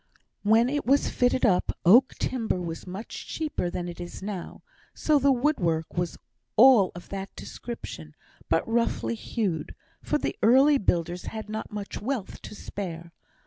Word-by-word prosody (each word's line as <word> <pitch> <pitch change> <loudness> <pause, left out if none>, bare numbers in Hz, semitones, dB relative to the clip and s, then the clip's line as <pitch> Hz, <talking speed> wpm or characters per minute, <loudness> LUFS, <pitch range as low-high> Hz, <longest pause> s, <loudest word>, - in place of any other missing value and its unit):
When 225 +3 +4
it 290 +2 -1
was 280 +2 +3
fitted 250 +1 +2
up, 185 -5 +2
oak 245 +9 +6
timber 230 -7 -1
was 170 0 -6
much 190 +5 -7
cheaper 300 - -2
than 175 0 -4
it 175 0 -7
is 175 +2 -8
now, 195 -3 -6 0.3
so 300 -2 +3
the 280 +1 +4
wood 280 +4 +2
work 165 -3 -1
was 175 -1 -2 0.4
all 235 -5 +7
of 175 - -10
that 195 0 -6
description; 80 - -8 0.3
but 165 - +2
roughly 225 - 0
hewed, 170 - -3 0.3
for - - 0
the - - -3
early 270 +5 +6
builders 175 -1 -1
had 220 -1 -6
not 215 0 -5
much 205 -2 -6
wealth 230 -3 -4
to - - -9
spare. 170 -5 -6
210 Hz, 160 wpm, -27 LUFS, 175-250 Hz, 0.4 s, all